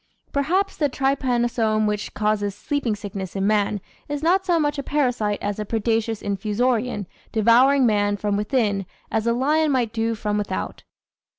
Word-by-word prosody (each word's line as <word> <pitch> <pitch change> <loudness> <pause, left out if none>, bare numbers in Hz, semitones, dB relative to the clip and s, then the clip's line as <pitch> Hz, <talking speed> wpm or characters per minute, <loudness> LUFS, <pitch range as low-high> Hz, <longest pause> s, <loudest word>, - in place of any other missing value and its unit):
Perhaps 360 +8 0
the 295 -3 +1
trypanosome 240 -5 +1
which 210 0 -2
causes 210 -2 0
sleeping 255 -3 -1
sickness 195 -3 -6
in 195 0 0
man 205 0 +2 0.3
is 290 0 -3
not 375 +3 +2
so 345 -2 +3
much 295 -1 0
a - - 0
parasite 245 -8 0
as 205 0 -2
a - - -1
predacious 225 0 -1
Infusorian 215 +2 0 0.3
devouring 245 +5 +5
man 205 -2 +2
from 205 0 -1
within 205 -3 0 0.2
as 220 +1 0
a 235 - +3
lion 300 +5 +2
might 240 -4 0
do 225 0 0
from 210 -1 -1
without. 205 - -4
225 Hz, 160 wpm, -23 LUFS, 210-270 Hz, 0.3 s, devouring